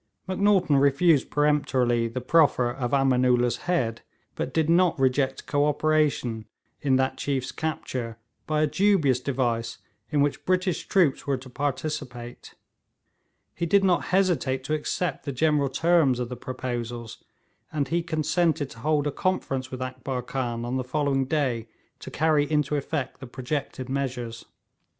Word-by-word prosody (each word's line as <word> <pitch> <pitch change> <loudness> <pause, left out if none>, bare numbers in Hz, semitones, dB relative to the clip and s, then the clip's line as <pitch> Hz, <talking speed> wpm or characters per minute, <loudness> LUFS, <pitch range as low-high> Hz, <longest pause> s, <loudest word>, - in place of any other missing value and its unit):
Macnaghten 190 -5 +3
refused 140 +2 +3
peremptorily 130 -5 +2
the 120 +2 -5
proffer 130 -3 +3
of 125 -1 -3
Ameenoolla's 125 -3 +3
head, 115 -11 0 0.3
but - - -3
did 160 -2 +1
not 170 -1 +3
reject 135 0 +1
co 145 0 +1
operation 150 -7 +1 0.3
in 135 -2 +2
that 130 0 0
chiefs 135 -3 -2
capture 125 -7 -4 0.3
by 155 0 +1
a - - +5
dubious 160 -6 +2
device 125 -4 -1 0.3
in 150 -2 +1
which 145 0 0
British 185 -1 0
troops 170 -10 +2
were 140 -1 +1
to 130 0 -12
participate; 140 -3 -4 1.0
he 170 - -2
did 200 +3 +4
not 180 -3 +2
hesitate 170 -9 +1
to 150 - -2
accept 155 +3 -2
the 140 - -3
general 145 +1 +2
terms 160 -2 +3
of 120 -1 -3
the 125 - -5
proposals; 120 -2 -5 0.5
and 145 -4 -1
he 170 +2 +1
consented 160 -2 0
to 115 - -12
hold 150 +3 +1
a 145 - 0
conference 135 -7 -2
with 130 0 -5
Akbar 130 0 -4
Khan 120 -2 -3
on 125 +2 -2
the 130 - -1
following 135 0 0
day 130 -6 -1 0.3
to - - -8
carry 150 -1 +2
into 150 -1 +1
effect 140 -2 -3
the 130 - -8
projected 130 +1 -4
measures. 125 -4 -3
140 Hz, 150 wpm, -26 LUFS, 125-155 Hz, 1.0 s, a